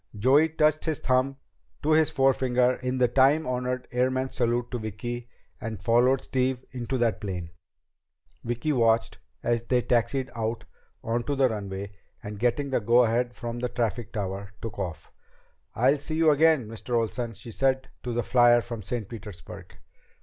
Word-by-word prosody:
Joey 135 +9 +4
touched 155 -1 +2
his 160 -3 0
thumb 130 +1 +1 0.5
to 155 - +1
his 155 0 +4
forefinger 130 -2 +2
in 130 0 -2
the 125 -1 +4
time 135 +6 +4
honored 125 0 -2
airman's 130 +1 0
salute 120 0 0
to 125 - -3
Vicki, 115 +3 -5 0.3
and 115 -4 -5
followed 120 +5 +3
Steve 130 0 -1
into 125 +1 -3
the 120 -3 +2
plane. 90 -6 -6 0.9
Vicki 120 +6 -1
watched 115 -3 +2 0.2
as 120 -1 +1
they 125 +1 +1
taxied 125 +2 0
out 115 0 -3 0.4
onto 120 +5 -1
the 135 -1 +4
runway, 100 -2 -5 0.3
and 105 0 -7
getting 130 +4 0
the - - +2
go 120 +4 +5
ahead 120 +2 0
from 120 -1 -5
the 125 0 -2
traffic 120 -2 -2
tower, 100 -1 -4
took 115 -3 -7
off. 85 -3 -5 0.6
"I'll 130 +6 +3
see 150 +3 -5
you 160 -1 +5
again, 150 -4 +4
Mr. 115 +2 -4
Olsen," 115 +1 -2
she 115 - -10
said 130 +2 0
to 125 - -4
the 120 0 -1
flier 120 -1 +5
from 115 -2 -6
St. 110 +1 -4
Petersburg. 105 -5 -10
120 Hz, 165 wpm, -27 LUFS, 115-130 Hz, 0.9 s, go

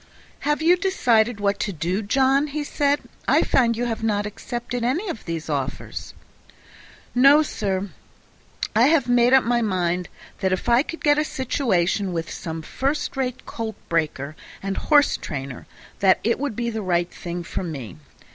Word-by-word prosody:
"Have 295 +1 +1
you 350 +2 +5
decided 245 - +2
what 200 0 0
to 205 - -1
do, 175 +4 -2
John?" 270 +6 +2
he 295 +1 -3
said. 285 0 +1 0.3
"I - - +4
find 230 -3 +2
you 245 - 0
have 230 -2 -3
not 205 -2 +1
accepted 240 +3 -4
either 335 - 0
of 225 - -9
those 165 -2 -4
offers." 140 -3 -4 1.0
"No, 275 +5 +6
sir; 200 -7 -2 0.8
I 230 +4 +6
have 295 -5 +3
made 245 0 +4
up 265 -1 +6
my 240 0 +1
mind 180 -4 0 0.3
that 190 -1 +1
if 185 - -2
I 240 +1 +5
could 330 +3 -7
get 295 0 +4
a - - +2
situation 205 - 0
with 165 0 -3
some 160 -1 -5
first 285 - -2
rate 255 -1 -3
colt 225 -1 -5
breaker 155 -3 -1 0.3
and 195 0 -2
horse 290 -2 +3
trainer, 135 -3 -6 0.3
it 200 +5 +3
would 280 -5 -2
be 235 +1 -2
the 220 -1 -3
right 175 -2 0
thing 175 0 -5
for 165 - -4
me. 135 - -6
225 Hz, 165 wpm, -23 LUFS, 180-265 Hz, 1.0 s, No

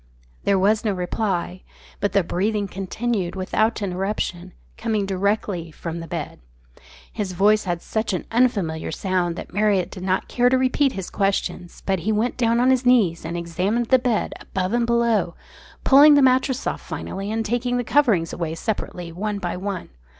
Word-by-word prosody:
There 200 -1 +3
was 210 +3 +2
no 215 -3 +1
reply; 185 -1 -2 0.4
but 205 - 0
the 200 -2 +3
breathing 205 +4 -1
continued 195 0 -3
without 215 +4 0
interruption, 185 -1 -3 0.2
coming 220 -3 -1
directly 195 -2 -1
from 165 +1 -6
the 165 - -7
bed. 165 -4 -5 0.7
His 205 -4 -3
voice 210 +4 +3
had 175 -2 -2
such 220 0 -2
an 185 - -3
unfamiliar 200 -11 +1
sound 180 -1 -1
that - - -8
Marriott 205 -3 +1
did 185 - -8
not 185 0 0
care 245 0 +2
to 260 - +3
repeat 260 +2 +2
his 190 -2 -6
questions, 195 -3 -2
but 190 -2 +1
he 215 +6 -1
went 220 +3 0
down 235 -1 +2
on 255 +2 +4
his 260 -1 +2
knees 220 -10 +3
and 170 +2 -4
examined 185 +8 -1
the 260 - +6
bed 245 -3 0
above 185 +2 -3
and 240 -1 +1
below, 235 -7 +1 0.5
pulling 290 +2 +8
the 285 - +5
mattress 260 0 +2
off - - -2
finally, 195 +2 -5
and 225 0 -1
taking 245 +2 0
the 245 - 0
coverings 225 - +2
away 165 -2 -3
separately 180 -3 -4
one 205 +4 -3
by 175 -3 -3
one. 190 -1 -4
200 Hz, 175 wpm, -23 LUFS, 180-235 Hz, 0.7 s, pulling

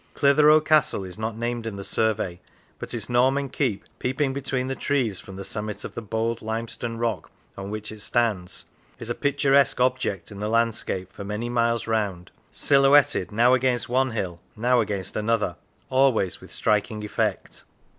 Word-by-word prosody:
Clitheroe 150 +2 +6
Castle 150 -8 +3
is 90 +1 -9
not 110 0 -3
named 120 0 -3
in 110 - -4
the 100 - -6
survey, 105 -5 0 0.4
but - - -7
its 115 -3 -2
Norman 130 +3 +2
keep, 100 -4 -1 0.2
peeping 135 +2 0
between 135 -1 -2
the 135 - -1
trees 125 -11 0
from 95 - -11
the 100 - -6
summit 105 +1 -5
of - - -7
the - - -5
bold 115 +2 -2
lime 110 +1 -3
stone 115 0 -5
rock 115 -6 -2 0.3
on 95 0 -6
which 105 0 -5
it 110 -1 -9
stands, 105 -6 0 0.3
is 115 - -5
a - - +1
picturesque 140 0 +2
object 125 -7 0
in 100 - -9
the 105 +1 -2
landscape 110 -5 -1
for 100 - -7
many 105 +4 -3
miles 115 -1 +1
round, 100 -6 -2 0.2
silhouetted 140 -7 +4
now 120 +4 +4
against 130 -1 +1
one 130 +2 +2
hill, 95 -7 -4 0.2
now 120 +3 +2
against 100 -3 -4
another, 105 -4 0 0.4
always 130 -8 +2
with - - -13
striking 105 +1 0
effect. 105 - -2
115 Hz, 175 wpm, -25 LUFS, 105-130 Hz, 0.4 s, Clitheroe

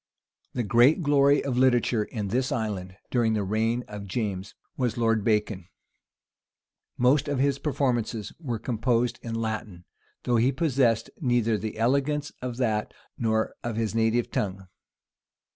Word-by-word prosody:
The 125 - -1
great 120 - +4
glory 140 -1 +4
of 130 -3 -1
literature 120 -4 +3
in 105 -4 -4
this 130 +5 0
island 100 -5 -3
during 115 -3 +2
the 105 - 0
reign 110 +4 0
of 105 -1 -8
James, 100 -2 -3 0.2
was 125 -4 -1
Lord 115 -2 +2
Bacon. 105 -4 0 1.3
Most 130 +4 +3
of 145 -1 -1
his 140 +1 +1
performances 120 -7 -1
were 125 -8 -3
composed 120 +1 0
in 115 -1 -5
Latin; 110 -5 -4 0.4
though 120 -1 +2
he 120 +4 +3
possessed 130 -6 +1
neither 120 -6 +2
the 110 +1 -4
elegance 140 +5 +1
of 125 -1 -4
that, 110 -4 -1 0.2
nor 110 -1 0
of 120 -2 -3
his 110 -1 -1
native 115 +1 +1
tongue. 95 -1 -3
115 Hz, 145 wpm, -26 LUFS, 110-130 Hz, 1.3 s, great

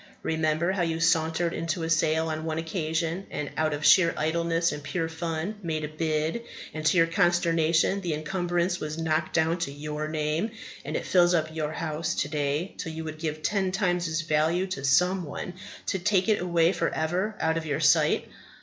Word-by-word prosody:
Remember 160 +2 +1
how 190 -1 -1
you 165 -1 0
sauntered 165 +1 +2
into 165 +1 -2
a 160 - -2
sale 160 0 +2
on 155 0 -3
one 160 -1 -2
occasion, 165 +2 -2
and, 145 - -4
out 155 0 +1
of 150 +1 -3
sheer 170 -3 +6
idleness 165 +2 +1
and 150 - -5
pure 160 +4 -2
fun, 165 +5 -4
made 160 -4 -2
a - - -1
bid, 155 +5 -1 0.3
and 155 - -5
to 185 - +3
your 165 - +6
consternation 170 +1 +2
the 170 -5 -1
encumbrance 175 +2 -1
was 155 +1 -4
knocked 160 -1 0
down 165 +2 +2
to 170 -4 -2
your 150 +1 -4
name; 155 +6 -1 0.3
and - - -5
it - - -5
fills 175 -1 +4
up 160 -1 0
your 155 -1 -2
house 160 +1 -2
to - - 0
day 150 +4 -1
till 165 - -4
you 160 0 -5
would 155 -1 -7
give 155 -1 -4
ten 195 -3 +1
times 180 -3 0
its 160 +1 -1
value 165 +3 +1
to 185 -8 -5
some 180 +7 +3
one 165 +3 -6 0.3
to 190 - -1
take 190 +1 +2
it 215 -4 +2
away 170 -1 +3
for 170 -3 0
ever 180 +7 -1
out 160 0 +1
of 160 -1 -4
your 145 -1 -1
sight. 150 0 +3
160 Hz, 200 wpm, -27 LUFS, 155-175 Hz, 0.3 s, sheer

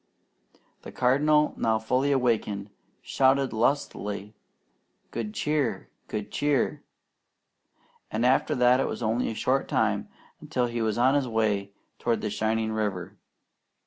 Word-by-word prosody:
The - - -9
Cardinal, 150 +4 +3
now 110 -1 +2
fully 125 +6 0
awakened, 110 -6 0 0.3
shouted 135 0 +2
lustily, 105 -4 -1 0.8
"Good 115 -3 -4
Cheer! 150 -4 -1 0.2
Good 105 -1 -5
Cheer!" 145 -3 0 1.3
and 110 +3 -1
after 130 +2 +3
that 125 +1 +4
it - - +1
was - - -4
only 115 +3 0
a 115 - -4
short 135 +4 0
time - - 0 0.3
until 125 - -1
he 120 -1 -3
was 110 -1 0
on 130 +3 +4
his 140 -3 +1
way 105 -3 0 0.3
toward 115 -1 0
the 105 - -2
shining 110 +1 0
river. 100 -5 -3
120 Hz, 130 wpm, -27 LUFS, 110-130 Hz, 1.3 s, that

